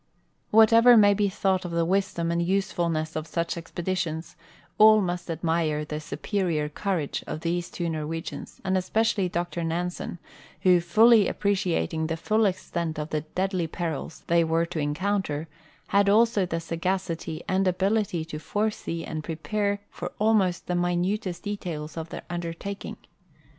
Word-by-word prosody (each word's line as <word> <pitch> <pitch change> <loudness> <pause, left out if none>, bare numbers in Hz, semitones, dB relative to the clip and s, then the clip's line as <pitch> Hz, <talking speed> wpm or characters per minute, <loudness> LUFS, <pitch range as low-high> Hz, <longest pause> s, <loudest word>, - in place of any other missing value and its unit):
"Wdiatever 230 +2 +7
may 205 -1 +7
be 200 0 +1
thought 190 -1 0
of 175 - -4
the 170 0 0
wisdom 185 -2 0
and 170 0 +1
usefulness 170 -3 0
of 155 0 -3
such 170 0 -1
exi)editions, 170 -1 -3 0.5
all 215 0 +8
must 175 -2 -2
admire 160 -2 0
the 150 0 -4
superior 155 0 -2
courage 170 -2 -2
of 155 - -4
these 170 +1 -1
two 175 - -3
Norwegians, 160 +1 -5
and 190 -1 0
especially 195 0 +1
Dr 175 -1 -2
Nansen, 175 +2 -3 0.4
who, 180 -2 +5
fully 220 +5 +6
appreci 200 -4 0
ating 160 -1 -1
the 165 0 -2
full 215 +6 +2
extent 170 -4 -3
of 150 0 -4
the 155 - 0
deadly 185 +2 -2
perils 160 -1 -4
they 170 0 +3
were 165 +1 +1
to 170 -1 -5
encounter, 160 0 -1 0.4
had 200 0 +4
also 215 -2 +4
the 165 -1 -2
sagacity 165 -1 -3
and 190 0 +1
ability 190 -2 +1
to 155 -1 -6
foresee 205 -3 -2
and 155 -1 -5
prepare 200 +6 -2
for 175 - -6
almost 210 -5 +2
the 180 - -2
minutest 175 +2 -1
details 175 -7 -5
of 160 0 -5
their - - -7
undertaking. 175 +3 -5
175 Hz, 150 wpm, -26 LUFS, 165-200 Hz, 0.5 s, all